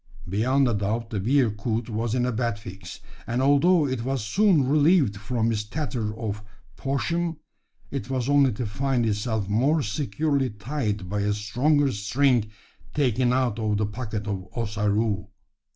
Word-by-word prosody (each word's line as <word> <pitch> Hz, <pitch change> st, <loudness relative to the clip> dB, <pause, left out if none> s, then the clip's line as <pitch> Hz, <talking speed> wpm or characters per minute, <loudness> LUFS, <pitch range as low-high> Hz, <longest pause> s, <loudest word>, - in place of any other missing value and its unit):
Beyond 125 Hz, +8 st, +2 dB
a 120 Hz, -, +1 dB
doubt 110 Hz, +3 st, -2 dB
the 105 Hz, -, -1 dB
bearcoot 115 Hz, -1 st, +1 dB
was 115 Hz, +1 st, -2 dB
in 125 Hz, -1 st, +1 dB
a 125 Hz, -, 0 dB
bad 115 Hz, -2 st, -1 dB
fix; 95 Hz, -2 st, -10 dB, 0.3 s
and, 120 Hz, +1 st, -1 dB
although 145 Hz, +5 st, +4 dB
it 130 Hz, -4 st, -2 dB
was 130 Hz, -3 st, -2 dB
soon 180 Hz, -, +3 dB
relieved 150 Hz, -, +4 dB
from 115 Hz, +3 st, -1 dB
its 105 Hz, -2 st, -1 dB
tether 110 Hz, -3 st, -3 dB
of 105 Hz, -2 st, -4 dB, 0.3 s
poshm, 165 Hz, +4 st, -1 dB, 0.5 s
it 135 Hz, -2 st, -4 dB
was 130 Hz, -2 st, -1 dB
only 140 Hz, -2 st, +4 dB
to 120 Hz, +4 st, -3 dB
find 125 Hz, +3 st, 0 dB
itself 105 Hz, -1 st, -1 dB
more 135 Hz, +9 st, +2 dB
securely 135 Hz, +4 st, 0 dB
tied 105 Hz, -2 st, -3 dB
by 105 Hz, +3 st, -2 dB
a 105 Hz, +1 st, +1 dB
stronger 130 Hz, +7 st, +1 dB
string 110 Hz, +2 st, +1 dB, 0.5 s
taken 130 Hz, -4 st, +2 dB
out 125 Hz, -4 st, +1 dB
of 105 Hz, -2 st, 0 dB
the 105 Hz, -, +1 dB
pocket 105 Hz, -1 st, -4 dB
of 95 Hz, -3 st, -4 dB
Ossaroo. 105 Hz, -2 st, 0 dB
115 Hz, 155 wpm, -25 LUFS, 105-135 Hz, 0.5 s, although